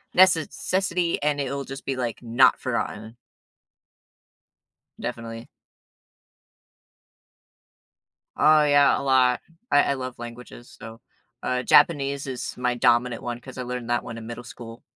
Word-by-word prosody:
nece 185 -4 +5
cessity 180 -2 -1
and 145 -1 0
it'll 140 0 -4
just 135 0 -9
be, 135 - -2
like, 120 -3 -3
not 120 +1 +4
forgotten. 110 +2 -4 1.9
Definitely. 115 0 -6 2.9
Oh, 155 0 +5
yeah, 145 -1 +4
a - - -4
lot. 130 -2 +3 0.3
I 145 - +5
I 140 - 0
love 130 -2 -6
languages 120 +1 -11
so, 115 +1 -11 0.4
uh, 125 0 -1
Japanese 140 -4 +3
is 130 -2 -5
my 125 0 0
dominant 120 0 +2
one 120 0 -5
'cause 130 +1 -11
I 125 - -3
learned 125 -1 -5
that 120 - +1
one 115 -1 -7
in 110 - -9
middle 120 +1 -8
school. 115 -1 -11
125 Hz, 130 wpm, -24 LUFS, 120-140 Hz, 2.9 s, nece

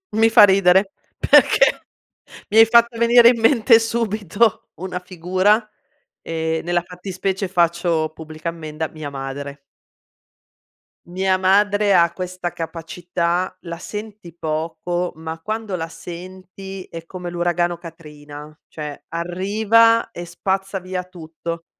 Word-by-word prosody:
Mi 225 +1 +4
fa 220 - +7
ridere 190 0 +4 0.3
perché - - +4 0.7
mi 215 - +1
hai 225 - +9
fatto 235 +1 +4
venire 235 0 +6
in 240 -2 +1
mente 230 0 +5
subito 220 -2 0
una 180 +1 -5
figura 185 +5 0 0.5
e 160 0 -2
nella 175 0 0
fattispecie 185 +2 -4
faccio 170 -3 +1
pubblica 155 +1 -7
ammenda: 155 -1 -5
mia 155 -2 -8
madre. 140 +1 -6 1.5
Mia 185 +1 0
madre 205 +2 +3
ha 170 -2 +4
questa 180 -1 -5
capacità: 170 +2 -3
la 170 -1 -7
senti 210 -2 -8
poco 165 +2 -3
ma 160 0 -7
quando 215 +1 -4
la 165 -2 -4
senti 185 +3 -9
è 165 0 -10
come 180 0 -7
l'uragano 175 0 -1
Katrina. 150 -3 -12
Cioè 150 -2 -8
arriva 210 +7 +2
e 175 - -7
spazza 190 +3 -3
via 185 0 -5
tutto. 170 -1 -8
180 Hz, 120 wpm, -20 LUFS, 165-200 Hz, 1.5 s, hai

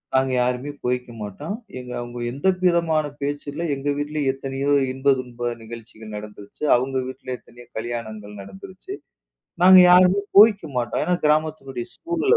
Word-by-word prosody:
நாங்க 130 0 +2
யாருமே 125 +3 -1
போய்க்க 125 0 -1
மாட்டோம். 145 - -5 0.2
எங்க 125 0 -9
அவங்க 120 0 -7
எந்த 140 +8 -2 0.2
விதமான 165 -4 +2
பேச்சு 145 +1 -3
இல்ல. 165 - -5
எங்க 140 +1 -3
வீட்டுல 150 +1 -2
எத்தனையோ 135 +1 -3 0.2
இன்ப 135 +1 +3
துக்க 120 -1 -4
நிகழ்ச்சிகள் 110 -1 -10
நடந்துருச்சு. 105 +3 -10
அவங்க 130 +2 -1
வீட்டுல 130 0 -6
எத்தனையோ 120 0 -17
கல்யாணங்கள் 110 -3 -6
நடந்துருச்சு. 140 - -10 0.7
நாங்க 185 +1 +9
யாரும் 180 +2 +6 0.2
போய்க்க 210 -3 +7
மாட்டோம். 120 -1 -1
ஏன்னா 180 - +1
கிராமத்துளுடைய 150 -5 0
சூழல் 345 +6 +1
135 Hz, 140 wpm, -23 LUFS, 120-155 Hz, 0.7 s, நாங்க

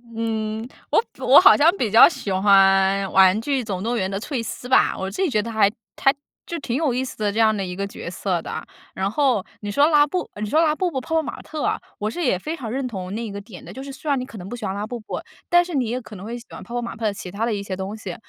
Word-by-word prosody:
嗯， 220 -1 -2 0.3
我 - - +4 0.2
我 - - +8
好 - - +8
像 330 +5 +5
比 230 - -1
较 225 +3 +9
喜 265 - -4
欢 195 0 +4
玩 190 +2 +5
具 270 0 -1
总 195 -3 -4
动 235 +1 -1
员 190 -2 -1
的 195 - -3
翠 265 +1 -3
丝 230 +2 -6
吧， 260 - +4
我 190 0 -3
自 385 - -4
己 375 - +2
觉 215 -6 +1
得 230 +2 -6
还 215 -3 +4 0.3
还 270 - +5 0.3
就 340 - -4
挺 245 -4 -3
有 300 -4 +1
意 255 +2 0
思 260 - -7
的 210 -1 0
这 215 - -6
样 220 -1 +4
的 200 - -2
一 180 -1 -5
个 200 +1 -2
角 195 - -7
色 180 -1 -2
的。 - - -5 0.3
然 190 +1 -1
后 255 -8 +1
你 205 - -6
说 285 +9 +4
拉 295 -2 +5
布 365 +4 -3
你 210 - -2
说 315 +5 +3
拉 310 -2 +3
布 365 +2 0
布、 270 -6 -3
泡 320 - -3
泡 320 - +4
玛 - - -7
特 310 -2 -6
啊， - - 0 0.2
我 210 +1 -2
是 345 +9 -4
也 215 -9 +1
非 310 - -4
常 235 -8 -6
认 265 0 -2
同 190 -4 -6
那 225 +1 -4
个 200 0 -6
点 200 -3 -12
的， - - -10
就 265 - -7
是 275 - -7
虽 280 +3 -7
然 280 - +3
你 250 - -4
可 230 - -11
能 180 0 -8
不 240 - -5
喜 230 -3 -6
欢 190 - -2
拉 205 +2 -4
布 245 0 -5
布， 215 - -5 0.3
但 350 0 +5
是 345 - -7
你 255 -5 0
也 250 +2 -2
可 220 - -12
能 190 +1 -9
会 235 +2 -5
喜 235 - -15
欢 - - -9
泡 235 - -11
泡 245 - 0
玛 235 -1 -5
特 225 - -4
的 210 - +1
其 190 - -8
它 205 +5 -2
的 235 - 0
一 200 - -2
些 195 -1 -5
东 190 +3 -5
西。 190 -5 -6
225 Hz, 330 characters per minute, -22 LUFS, 200-270 Hz, 0.3 s, 较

